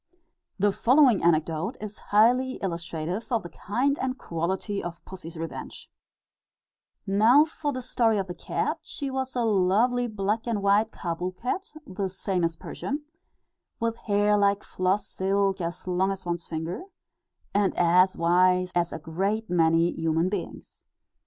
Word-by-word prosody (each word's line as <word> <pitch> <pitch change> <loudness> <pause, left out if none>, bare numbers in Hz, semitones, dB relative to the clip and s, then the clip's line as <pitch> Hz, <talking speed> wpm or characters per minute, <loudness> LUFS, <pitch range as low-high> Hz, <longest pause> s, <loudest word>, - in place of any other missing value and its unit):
The 205 +1 +3
following 255 +1 +4
anecdote 165 - +1
is 210 0 -7
highly 245 +5 +4
illustrative 170 +3 -4
of 230 -2 +1
the 175 - -9
kind 265 +8 -1
and 260 0 -2
quantity 190 +5 -3
of 175 -1 -7
pussy's 175 -3 -9
revenge: 165 0 -7 1.1
"Now 220 +9 +5
for 305 -2 -3
the 255 -2 -5
story 230 -3 +2
of 195 - -1
the 180 - -6
cat; - - -2
she 280 -2 -5
was 265 0 -3
a 245 - +1
lovely 220 +5 +2
black 210 +1 -2
and 215 -4 -1
white 205 +2 +3
Kâbul 180 +1 -4
cat 380 - -3
(the 190 -5 -3
same 185 -1 -2
as 165 -1 0
Persian) 285 - -5 0.8
with 230 0 0
hair 205 -1 +2
like 200 0 +2
floss 190 +2 0
silk, 195 0 0
as 170 +2 -5
long 185 +1 +1
as 195 -1 -5
one's 170 -1 -3
finger; 165 - -4 0.7
and 200 -1 +1
as 180 +2 +4
wise 180 +2 +3
as 175 -1 +1
a - - -4
great 190 +7 -2
many 165 0 +3
human 165 +2 0
beings. 205 - -6
195 Hz, 150 wpm, -26 LUFS, 175-225 Hz, 1.1 s, Now